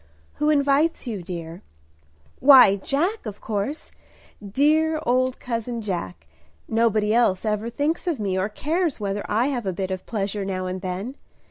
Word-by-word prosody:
"Who 300 - +1
invites 285 +2 +2
you, 220 -6 -4
dear?" 170 -1 -7 0.8
"Why, 255 -8 +8
Jack, 330 - -1
of 205 -1 -7
course, 220 +8 -4 0.5
dear 305 +9 +2
old 255 +1 +1
cousin 235 -1 -3
Jack. 95 - -5 0.4
Nobody 220 -2 +2
else 225 -4 +2
ever 215 +1 -1
thinks 295 +9 -2
of 325 -8 0
me, 195 -3 -1
or 190 +2 0
cares 315 - -1
whether 200 0 -2
I 230 +6 +2
have 245 -7 -3
a 190 - 0
bit 190 +1 -3
of 185 -1 -5
pleasure 205 -2 -2
now 185 -1 -3
and 185 0 -4
then. 195 +9 -5
220 Hz, 155 wpm, -23 LUFS, 195-275 Hz, 0.8 s, Why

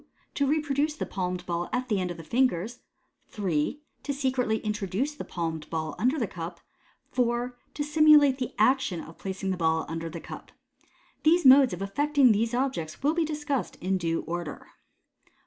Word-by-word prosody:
To 280 - +1
reproduce 300 0 0
the - - -3
palmed 180 -1 -3
ball 175 0 -2
at 250 0 -1
the 210 -5 +1
end 180 - -2
of 175 - -6
the 165 - -9
fingers. 235 +2 0 0.5
3. 190 - -1 0.2
To 285 - -3
secretly 260 -5 0
introduce 210 - -2
the 295 - -7
palmed 160 -3 -4
ball 160 -1 -3
under 255 +7 +2
the 245 - 0
cup. 170 -2 -7 0.5
4. 245 0 0 0.2
To 295 - -1
simulate 295 -2 +5
the 250 - -4
action 255 -4 +2
of 165 - -12
placing 190 0 -3
the 185 - -2
ball 160 -1 +1
under 165 0 -4
the 165 +1 -7
cup. - - -10 0.7
The 330 +3 +5
modes 265 0 +8
of 180 +2 -4
effecting 285 +5 +3
these 225 +3 +1
objects 250 -10 -2
will 295 +2 +3
be 335 -1 +1
discussed 295 - -2
in 190 +1 -1
due 165 -1 -1
order. 170 -2 -6
230 Hz, 175 wpm, -27 LUFS, 175-275 Hz, 0.7 s, modes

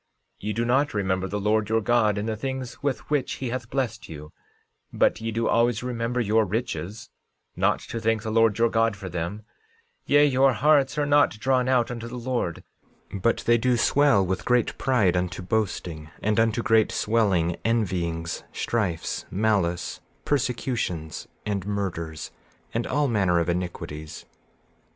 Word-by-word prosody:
13:22 105 - -6
Ye 105 - 0
do 115 +3 -1
not 135 +4 +2
remember 95 -1 0
the 105 +2 -3
Lord 105 +1 +1
your 110 0 +3
God 110 -2 +2
in 105 - -2
the 110 -1 -2
things 130 +1 -5
with 140 -3 -2
which 145 -4 +1
he 130 - -4
hath 120 -2 -4
blessed 125 -4 -3
you, 75 -1 -9 0.6
but 110 - +2
ye 115 0 -2
do 115 +1 0
always 120 -1 +2
remember 125 0 -2
your 110 -1 +3
riches, 105 -1 -4 0.4
not - - +2
to 115 - -5
thank 110 -1 0
the 110 - -3
Lord 115 -1 +3
your 115 0 +4
God 115 -2 +2
for 95 -1 -7
them; 90 +5 -4 0.6
yea, 145 0 +6
your 135 -1 +4
hearts 140 +3 +3
are 145 - +2
not 145 -6 +3
drawn 130 0 +2
out 125 -2 +2
unto 115 -1 -5
the 125 +1 -7
Lord, 120 -8 -2 0.5
but 100 +4 0
they 120 0 +4
do 125 +1 +2
swell 115 -5 +4
with 95 +1 -2
great 125 -1 +1
pride, 110 -9 +2
unto 90 0 -2
boasting, 90 -7 -2
and 110 +1 +2
unto 115 +1 +2
great 110 -1 +3
swelling, 95 -7 +1
envyings, 85 -7 -1
strifes, 95 -8 -2
malice, 95 -4 0 0.2
persecutions 120 - -2 0.2
and 100 -2 -2
murders, 85 -6 -4 0.4
and 115 +1 -1
all 145 +2 +1
manner 95 -7 +2
of 85 - 0
iniquities. 85 -3 -4
110 Hz, 165 wpm, -25 LUFS, 95-125 Hz, 0.6 s, yea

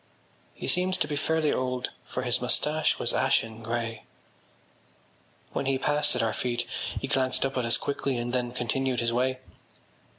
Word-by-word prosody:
He - - -5
seemed 185 +1 +3
to - - 0
be 145 - -2
fairly 155 +1 +2
old 125 -1 -1
for 125 - -3
his 120 -1 +1
moustache 150 +5 +2
was - - -1
ashen 115 0 +1
grey. 115 -1 -3 1.5
When 135 - -1
he 135 -1 +2
passed 145 +1 +1
at 125 - +1
our 110 -1 +1
feet 120 +1 -1 0.3
he 135 - -3
glanced 130 -1 +2
up 135 - -2
at 125 -2 0
us 115 - +4
quickly 140 -2 -1
and 120 +1 -2
then 125 -1 0
continued 125 +1 0
his 115 0 +1
way. 130 +2 +1
125 Hz, 170 wpm, -28 LUFS, 120-140 Hz, 1.5 s, us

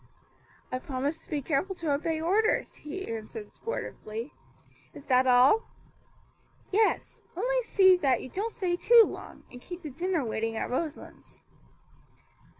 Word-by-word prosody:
"I 255 - -2
promise 275 +4 -3
to - - -21
be 290 -3 -2
careful 330 +8 -1
to 330 -4 -2
obey 315 +2 -1
orders," 400 +7 +1
he 375 +6 -6
answered, 230 - -7
sportively. 230 - -6 0.6
"Is 285 - -11
that 255 -1 +3
all?" 255 - +5 1.0
"Yes; 425 +2 +1 0.2
only - - +1
see 380 -5 +5
that 270 -8 +2
you 260 - -8
don't 420 - -3
stay 365 -6 -1
too 470 +4 +7
long, - - -9
and 245 - -11
keep 355 +3 -9
the 300 - -6
dinner 340 0 -1
waiting 225 0 -2
at - - -3
Roselands." 305 +4 -6
320 Hz, 145 wpm, -28 LUFS, 255-385 Hz, 1.0 s, too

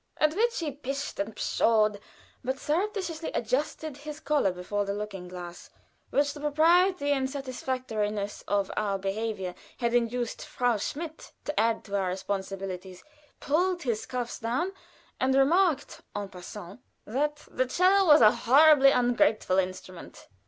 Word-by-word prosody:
At 305 0 +3
which 465 +3 +1
he 320 -4 -2
pished 275 0 -5
and 205 +2 -3
pshawed, 215 -2 +2 0.4
but 260 +1 -2
surreptitiously 345 +1 -2
adjusted 275 +4 -2
his 300 +1 -8
collar 290 -12 +1
before 180 +3 -2
the 200 0 -3
looking 200 -3 -6
glass 175 -1 -9 0.4
which 285 0 +1
the 295 - -10
propriety 320 +2 +3
and 265 -2 +1
satisfactoriness 250 -6 -3
of 200 -1 0
our 205 -2 0
behavior 195 -1 -3 0.2
had 235 -1 -1
induced 240 0 0
Frau 245 -2 0
Schmidt 315 +9 -6
to 295 - -1
add 225 0 +1
to 200 - -5
our 195 -2 +1
responsibilities, 190 -1 -5 0.4
pulled 350 +4 +1
his 230 -4 -2
cuffs 245 -2 -4
down, 250 +11 -1 0.5
and 265 0 +2
remarked 300 +1 +2
en 205 -1 -4
passant 185 +2 -10 0.3
that 295 +6 -2
"the 255 0 0
'cello 370 +6 +4
was 300 -3 +8
a 215 -1 +8
horribly 275 +2 +6
ungraceful 245 -6 +2
instrument." 185 -1 -6
245 Hz, 140 wpm, -28 LUFS, 205-295 Hz, 0.5 s, was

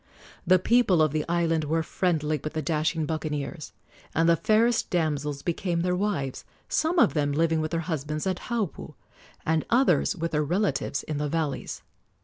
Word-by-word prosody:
The 185 +1 +6
people 205 -2 +3
of 155 -2 +4
the 155 0 0
island 165 -2 +1
were 160 +2 0
friendly 155 -3 0
with 155 - -4
the 155 - -2
dashing 155 0 0
buccaneers, 155 0 -4 0.4
and 165 +1 +3
the 170 - +6
fairest 220 +6 +2
damsels 150 -5 -1
became 170 0 -1
their 180 +1 +1
wives, 180 -9 -2 0.2
some 325 +3 0
of 235 -9 +5
them 145 -2 +1
living 160 +2 +1
with 155 - -2
their 165 0 -1
husbands 155 -2 -3
at 185 -2 -1
Haupu, 225 -8 -3 0.5
and 160 0 +1
others 255 +3 +3
with 165 -1 -3
their 150 -1 +1
relatives 175 -3 -1
in 150 -2 -4
the 150 0 -1
valleys. 155 -3 -3
160 Hz, 170 wpm, -26 LUFS, 150-180 Hz, 0.5 s, The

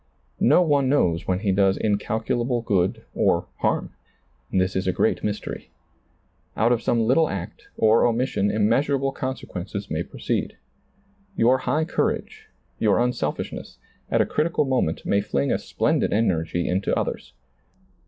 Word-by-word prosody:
No 150 +8 +5
one 140 -5 +2
knows 90 - +1
when 95 0 0
he 100 -3 +1
does 95 0 +3
incalculable 115 +3 -1
good 95 -5 0
or - - +2
harm. - - 0 0.6
This 95 0 +1
is 95 0 -1
a - - +3
great 110 - 0
mystery. 105 0 -4 0.9
Out 115 +2 +3
of 120 -1 +2
some 120 -1 +1
little 155 +7 +3
act 95 -3 -6
or 110 +2 +4
omission 120 -4 0
im 105 0 +2
measurable 135 +3 +1
consequences 100 -7 -5
may 80 +1 -1
proceed. - - -3 0.8
Your 125 +3 +4
high 155 +4 +1
courage, - - -2 0.3
your 105 -2 +3
unselfishness, 120 -12 -2 0.3
at - - +3
a - - +3
critical 160 -1 0
moment 130 -12 -1
may 100 - +2
fling 70 -8 -1
a - - +1
splendid - - 0
energy 85 -5 0
into 95 +2 0
others. - - -3
110 Hz, 145 wpm, -24 LUFS, 95-130 Hz, 0.9 s, No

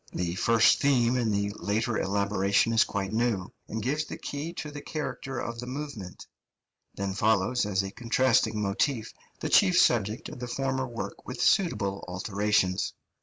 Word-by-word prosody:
The 85 -1 -2
first 115 +4 +4
theme 125 -4 +3
in 120 -3 +1
the 100 0 0
later 110 +3 0
elaboration 100 +2 +1
is 115 - +6
quite 100 0 -3
new, 110 -5 0
and 110 -1 -4
gives 150 +5 0
the - - -7
key 145 +3 -5
to 150 -3 -6
the 145 0 -7
character 140 -4 -5
of 115 -1 -4
the 125 - -6
movement; 130 -9 -6 0.7
then 100 0 -2
follows 110 +3 +2
as 100 -1 +1
a 95 - -5
contrasting 115 -2 +2
motif 110 +3 -1 0.3
the - - -2
chief 185 -3 +5
subject 110 -1 +2
of - - -9
the 125 - -5
former 130 +1 -1
work 120 -2 -7
with - - -6
suitable 100 - +2
alterations. 95 0 0
110 Hz, 165 wpm, -28 LUFS, 100-130 Hz, 0.7 s, is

